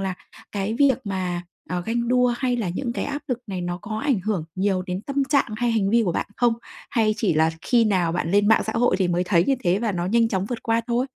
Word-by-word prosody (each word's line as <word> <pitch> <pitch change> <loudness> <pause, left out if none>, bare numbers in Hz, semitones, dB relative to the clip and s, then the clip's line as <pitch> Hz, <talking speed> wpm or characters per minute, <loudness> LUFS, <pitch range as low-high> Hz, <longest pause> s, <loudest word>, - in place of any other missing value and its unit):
là 190 -1 -2 0.4
cái 205 +2 -2
việc 270 0 +4
mà, 185 -3 -2 0.3
à, 180 -1 -2
ganh 235 +5 -2
đua 250 -1 +3
hay 250 -2 0
là 220 -6 -2
những 235 +8 -3
cái - - -3
áp 285 0 -4
lực 250 -3 -1
này 190 -3 -4
nó 175 0 -3
có 215 -1 -4
ảnh 265 -4 +1
hưởng 185 -4 -2
nhiều 190 -1 0
đến 180 0 -4
tâm 275 +2 -1
trạng 275 -5 +1
hay 240 +1 +1
hành 210 -4 +1
vi 230 +1 +4
của 175 - 0
bạn - - -2
không? 240 -2 +3 0.4
Hay 220 -5 +2
chỉ 195 -7 +1
là 160 +1 +3
khi 235 -2 +3
nào 185 -6 +1
bạn 170 -1 -1
lên 205 +2 +3
mạng 220 - +5
xã 220 - -2
hội 230 -4 +2
thì 185 -2 +1
mới 175 +1 +1
thấy 175 -2 +3
như 275 - +2
thế 180 +2 +3
và 220 -1 -1
nó 175 -1 -2
nhanh 230 +3 +3
chóng 190 -3 -1
vượt 240 +1 -5
qua 230 0 +1
thôi? 245 +2 0
215 Hz, 270 wpm, -23 LUFS, 185-240 Hz, 0.4 s, mạng